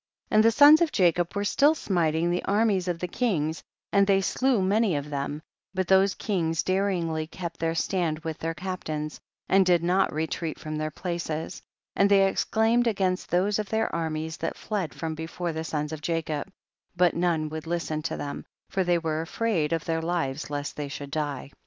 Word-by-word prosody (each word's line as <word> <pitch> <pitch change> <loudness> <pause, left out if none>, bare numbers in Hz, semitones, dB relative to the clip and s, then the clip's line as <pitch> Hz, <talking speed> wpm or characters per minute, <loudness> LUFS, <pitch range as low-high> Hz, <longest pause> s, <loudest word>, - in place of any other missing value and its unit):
47. - - -1
And 215 - +7
the 230 - +6
sons 290 +6 +8
of 330 -2 +2
Jacob 175 -1 +2
were 200 - 0
still 285 +9 +4
smiting 170 - +1
the 175 - -1
armies 200 -3 +2
of 175 -2 -1
the 180 - -3
kings, 165 -8 -1 0.3
and 200 -1 +4
they 195 -1 +4
slew 255 +5 +1
many 200 -1 +2
of 145 +1 -4
them, 145 +2 -3 0.3
but 185 -1 0
those 190 +1 +4
kings 165 -6 -1
daringly 180 -5 0
kept 170 0 -7
their 165 0 0
stand 165 -2 0
with 160 0 -6
their 165 0 -3
captains, 155 -4 -4 0.3
and 195 0 +5
did 175 -2 +3
not 185 +3 +2
re 155 +1 -1
treat 160 0 -4
from 155 0 -6
their 155 0 -2
places, 165 -1 -4 0.3
and 200 +1 +4
they 200 -1 +6
ex 195 - +1
claimed 230 +2 +2
against 190 -4 0
tliose 195 +4 +1
of 210 - -3
their 220 0 0
armies 160 -1 -3
that - - -3
fled 195 -8 -3
from 160 -1 -3
before 165 +2 -4
the 160 0 -3
sons 150 -2 -3
of 150 -1 -5
Ja 165 -1 0
cob, 150 0 -3 0.5
but 175 -1 +4
none 170 -3 +1
would 155 +1 -6
listen 165 -2 -2
to 160 - -3
them, 145 - -5 0.3
for 190 - +1
they 175 -1 +2
were 160 -2 -1
afraid 170 -2 -1
of 165 -2 -1
their 165 -1 -1
lives 160 -5 -2
lest 145 -1 -4
they 145 -1 -4
should 140 0 -7
die. 145 -3 -3
170 Hz, 200 wpm, -26 LUFS, 155-195 Hz, 0.5 s, sons